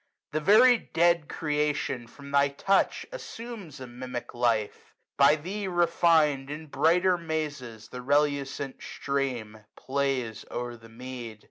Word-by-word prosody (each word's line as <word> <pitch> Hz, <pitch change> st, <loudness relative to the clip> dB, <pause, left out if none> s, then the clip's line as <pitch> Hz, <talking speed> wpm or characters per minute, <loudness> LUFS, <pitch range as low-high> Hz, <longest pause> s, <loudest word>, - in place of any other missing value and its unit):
The 155 Hz, -, 0 dB
very 225 Hz, +9 st, +6 dB
dead 170 Hz, -4 st, +2 dB
creation, 150 Hz, -5 st, -1 dB
from 140 Hz, +3 st, -12 dB
thy 140 Hz, 0 st, +4 dB
touch, 195 Hz, +8 st, +1 dB
160 -, -, -6 dB
Assumes 225 Hz, -, -8 dB
a 130 Hz, -, -7 dB
mimic 125 Hz, 0 st, -7 dB
life. 115 Hz, -3 st, -1 dB, 0.2 s
By 140 Hz, +2 st, +6 dB
thee 190 Hz, +6 st, -5 dB
refin'd. 165 Hz, -5 st, +3 dB
In 155 Hz, +2 st, -6 dB
brighter 175 Hz, +5 st, +3 dB
mazes 150 Hz, -9 st, -4 dB
the 125 Hz, -, -7 dB
relucent 140 Hz, 0 st, 0 dB
stream 125 Hz, -6 st, -3 dB, 0.2 s
Plays 130 Hz, -5 st, -2 dB
o'er 120 Hz, 0 st, -4 dB
the 115 Hz, 0 st, -15 dB
mead. 120 Hz, -2 st, -8 dB
140 Hz, 130 wpm, -28 LUFS, 125-165 Hz, 0.2 s, very